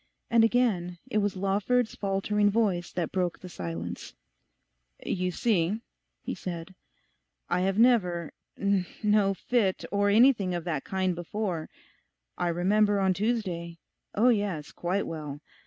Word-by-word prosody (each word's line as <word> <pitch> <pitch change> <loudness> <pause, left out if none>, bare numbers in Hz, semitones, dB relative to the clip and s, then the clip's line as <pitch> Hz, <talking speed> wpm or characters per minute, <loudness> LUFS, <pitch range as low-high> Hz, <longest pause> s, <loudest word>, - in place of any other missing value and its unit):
And 230 -1 +6
again 215 -7 +1
it 215 - +2
was 205 -1 0
Lawford's 205 +5 +1
faltering 205 +1 +1
voice 200 -5 0
that 170 -3 -2
broke 180 -2 -1
the 185 - -10
silence. 85 - -6 0.9
'You 185 -1 -1
see,' 195 0 +1 0.4
he - - -3
said, 170 0 -6 0.8
'I 180 - +2
have 195 +1 0
never... 180 -9 +3 0.2
no 200 +1 +1
fit, 205 -3 0
or 205 0 +2
anything 215 -4 +4
of 175 - -3
that 155 -5 -2
kind 190 -1 0
before. 175 -1 -3 0.7
I 175 - -1
remember 200 +4 +2
on 190 -1 +3
Tuesday... 180 -5 -2 0.4
oh 235 +5 +5
yes, 200 -9 0
quite 185 +3 -1
well. 150 -3 -6
190 Hz, 130 wpm, -28 LUFS, 175-210 Hz, 0.9 s, And